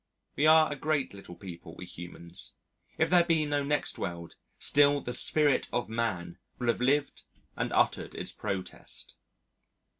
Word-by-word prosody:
We 150 - +3
are 155 0 +6
a - - -2
great 145 -3 -1
little 95 -3 -11
people, 85 -2 -10
we 90 - -9
humans. 85 -1 -3 0.4
If - - +1
there 175 -1 +6
be 165 -3 +1
no 145 -1 0
next 145 +1 -1
world, 85 -2 -5 0.2
still 145 0 +4
the 125 - -5
Spirit 145 +3 +5
of 120 - -2
Man 95 -7 -3 0.2
will 120 -1 -1
have 115 - 0
lived 140 +3 +1 0.3
and - - -2
uttered - - +1
its - - -4
protest. 95 -2 -6
125 Hz, 155 wpm, -29 LUFS, 90-145 Hz, 0.4 s, are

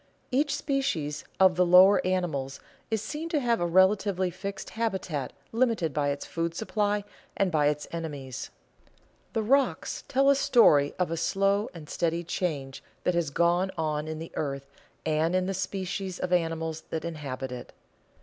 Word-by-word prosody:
_Each 290 +3 +2
species 270 - -1
of 190 -1 +6
the 180 - +4
lower 185 +3 +7
animals 155 -8 -1 0.3
is 220 -2 -1
seen 305 +8 -5
to 315 -3 +1
have 240 -3 +1
a 175 - +1
relatively 190 +1 +3
fixed 195 +2 -6
habitat 190 - -2 0.2
limited 225 - +1
by 145 -1 +1
its 140 0 -3
food 165 0 -3
supply 210 -1 0 0.3
and 195 -2 +2
by 150 -3 +3
its 150 0 -1
enemies._ 145 -7 -5 0.8
The 225 - 0
rocks 270 +5 +1
tell 275 +1 +4
a - - +4
story 150 - +4
of 180 -2 0
a 165 - -1
slow 195 +5 +1
and 155 -3 -9
steady 170 +1 -1
change 150 -6 -3 0.2
that 180 - +2
has 170 -3 0
gone 175 +5 +2
on 155 -1 -1
in 155 0 -4
the 165 +1 -7
earth 140 -2 -4 0.3
and 160 +2 +1
in 185 0 +2
the 195 - -1
species 190 0 -3
of 180 0 -2
animals 165 -2 0
that 160 0 -3
inhabit 135 -5 -5
it. 125 -1 -7
175 Hz, 165 wpm, -28 LUFS, 155-200 Hz, 0.8 s, lower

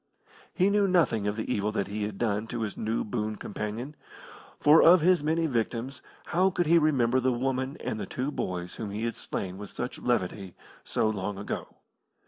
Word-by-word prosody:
He 195 +1 +2
knew 205 -1 +3
nothing 160 - +2
of 105 - 0
the 110 - -3
evil 105 +1 0
that 100 -2 0
he 105 +1 -3
had 105 -2 -5
done 110 -1 -1
to 120 0 -4
his 110 -3 -3
new 110 +1 -1
boon 110 0 -2
companion, 110 +8 -5 0.6
for 150 +2 +7
of 175 +1 +7
his 180 0 +4
many 160 +2 +1
victims 125 0 -2 0.2
how 185 +3 +2
could 175 -2 0
he 170 +2 +5
remember 130 -5 +3
the 130 0 +2
woman 130 +2 -1
and 110 - -3
the 100 - -4
two 130 +3 -3
boys 90 -8 -4
whom 110 -3 -4
he 105 +3 -4
had 115 0 -1
slain 95 0 -5
with 105 - -7
such 125 +1 -5
levity 100 -5 -1 0.3
so - - 0
long 100 -2 -2
ago! 100 - -4
115 Hz, 195 wpm, -28 LUFS, 105-150 Hz, 0.6 s, for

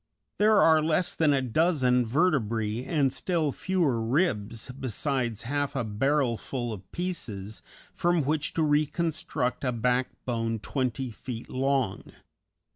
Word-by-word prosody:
There 215 +1 +5
are 160 -1 +6
less 160 +3 +1
than 155 -2 +3
a 135 -2 +2
dozen 130 -3 +2
vertebræ 115 - 0
and 140 -6 +2
still 160 -1 0
fewer 160 -9 0
ribs, 115 - 0
besides 130 -2 -2
half 145 +3 -2
a 135 - 0
barrelful 120 +1 -1
of 95 -2 -11
pieces, 110 - -5 0.3
from 175 -2 +1
which 150 +2 -1
to 160 - +2
reconstruct 150 -3 0
a 125 - +1
backbone 120 -1 -1
twenty 130 +2 -2
feet 115 +1 -7
long. 130 -5 -1
130 Hz, 120 wpm, -27 LUFS, 115-155 Hz, 0.3 s, are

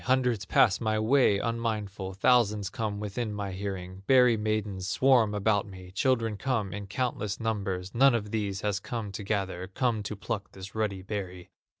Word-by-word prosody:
Hundreds 125 -5 +2
pass 95 +3 +4
my 110 -1 +1
way 110 -1 +4
unmindful, 105 -4 -2
Thousands 105 -2 +3
come 105 -2 -3
within 105 +2 -3
my 100 -2 -4
hearing, 95 -1 -5
Berry 125 -3 +6
maidens 105 -3 -2
swarm 120 -3 +3
about 105 0 +1
me, 95 -2 -11
Children 115 0 +1
come 110 -4 -1
in 100 0 -6
countless 105 -2 -2
numbers, 100 -4 -2
None 135 +1 +5
of 105 -3 -3
these 100 -3 -2
has 105 -2 0
come 115 -2 -5
to 100 +2 -6
gather, 95 -3 -2
Come 115 +3 0
to 105 +1 -5
pluck 100 0 -5
this 95 +1 -9
ruddy 105 -4 -2
berry." 95 -3 -6
105 Hz, 170 wpm, -28 LUFS, 95-115 Hz, -, Berry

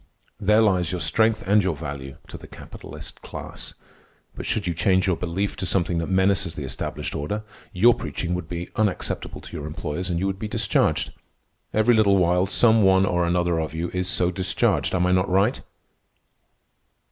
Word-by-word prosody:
There 105 +1 +4
lies 90 -5 +2
your 90 - -2
strength 110 +3 +2
and 105 +2 +4
your 90 -3 0
value—to 70 -3 -8
the - - -10
capitalist - - -10
class. - - -8 0.6
But - - -7
should 105 - -1
you 85 - -1
change 95 +3 +2
your 95 -3 +2
belief 90 +4 -2
to 95 - -3
something 85 -1 +1
that 85 - -3
menaces 95 -2 +2
the 75 - -5
established 65 -1 -4
order, 105 +9 -3 0.3
your 115 +6 +5
preaching 90 -5 -4
would 90 -2 -4
be 85 0 -4
unacceptable 105 -4 -2
to - - -10
your 75 -2 -5
employers, 80 +4 -4
and 85 - -1
you 95 - -1
would 95 -1 -2
be 110 - -3
discharged. 105 -2 +1 0.6
Every 110 +3 +3
little 105 -3 +4
while 90 +1 +2
some 110 +2 +4
one 95 -1 +5
or 90 -2 +1
another 85 -1 +1
of 80 0 -4
you 85 +2 -3
is 90 0 -1
so 90 -1 +1
discharged. 95 +1 0
Am 90 0 +2
I 90 - +2
not 90 +1 +2
right?" 100 +8 +2
90 Hz, 180 wpm, -24 LUFS, 85-100 Hz, 0.6 s, your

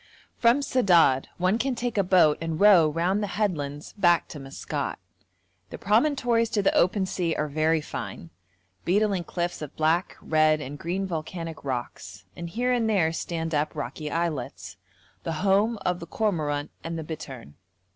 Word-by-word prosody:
From 240 +4 +4
Sedad 175 - +4
one 185 +5 +1
can 265 0 0
take 240 0 -3
a 205 - +3
boat 180 -5 +4
and 165 -1 -3
row 190 -7 +7
round 175 +6 0
the 205 - -1
headlands 150 -8 -2
back 175 -4 +3
to 150 - -8
Maskat. 135 0 -4 0.7
The - - -7
promontories 235 +1 +2
to 205 - +2
the - - +3
open 190 +2 +2
sea 175 -3 -1
are 150 - -1
very 155 +2 +1
fine: 85 - -7 0.5
beetling 195 0 +1
cliffs 175 -1 -3
of 150 - -7
black, 160 +3 +1
red, 155 -1 +3
and 145 0 -7
green 185 +3 -2
volcanic 165 -1 -5
rocks, 120 -7 -5
and 170 0 -6
here 245 +7 0
and 230 -2 +1
there 170 -7 +2
stand 165 -1 -3
up 150 +1 0
rocky 150 +2 -5
islets, 165 -6 -3 0.5
the 165 - -3
home 205 +4 +3
of 180 0 0
the 170 - -8
cormorant 155 -8 -1
and 165 0 -4
the 160 - -4
bittern. 135 - -8
170 Hz, 165 wpm, -26 LUFS, 155-200 Hz, 0.7 s, row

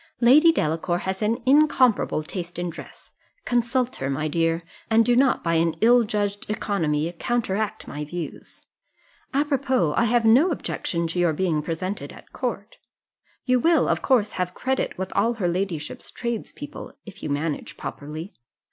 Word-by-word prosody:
"Lady 290 +7 +7
Delacour 165 - 0
has 190 +2 -4
an 230 +3 0
incomparable 260 - +3
taste 175 +1 -6
in 175 -1 -2
dress: - - -12 0.3
consult 245 +1 0
her, 135 - -3
my 150 +3 -1
dear, 165 +1 0 0.3
and 225 0 +4
do 245 - +3
not, 260 +1 +3
by 165 - +1
an 165 0 +2
ill 240 +2 +5
judged 205 -1 -2
economy, 170 -7 -1
counteract 220 -3 -1
my 150 - -5
views 170 +2 -8 0.7
apropos, 270 - +1
I 235 - +3
have 235 0 +2
no 255 +11 +6
objection 170 - -2
to 175 - -2
your 175 -2 +3
being 160 -2 0
presented 165 -1 -4
at - - -15
court. 235 -4 -4 0.7
You 255 -1 +3
will, 330 +5 +3
of - - +1
course, 230 -6 +2
have 180 -1 -3
credit 265 +1 -1
with 190 0 -4
all 230 +4 +2
her 210 -6 -1
ladyship's 175 -3 -3
tradespeople, 240 +5 -6
if 205 - -11
you - - -4
manage 145 +2 -3
properly. 155 +6 -7
205 Hz, 155 wpm, -24 LUFS, 165-245 Hz, 0.7 s, Lady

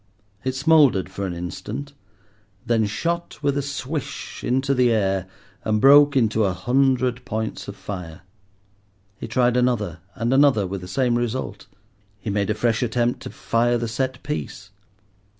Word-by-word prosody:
It 130 0 -2
smouldered 135 - +4
for 100 0 -3
an 90 - -4
instant, 90 - -6 0.7
then 115 -2 +2
shot 170 +11 -3
with 140 -1 +1
a 145 - +1
swish 140 +1 -5
into 135 +2 +1
the 125 -2 +3
air 95 -4 +1 0.4
and 110 -1 +1
broke 145 +2 +7
into 110 -3 +2
a 95 -2 +1
hundred 125 +4 +1
points 110 -1 -4
of 100 - -7
fire. 90 -6 -7 1.0
He - - -5
tried 125 -1 +2
another 115 -9 0 0.2
and 120 +2 0
another 135 -7 +4
with 95 0 -5
the 90 - -8
same 120 +3 +1
result. 120 +2 -4 0.5
He 110 - -4
made 100 0 0
a 105 - +1
fresh 115 0 +1
attempt 120 0 0
to - - -8
fire 120 +1 +1
the 120 0 -2
set 130 +3 -3
piece. 120 -8 -5
120 Hz, 155 wpm, -23 LUFS, 105-135 Hz, 1.0 s, broke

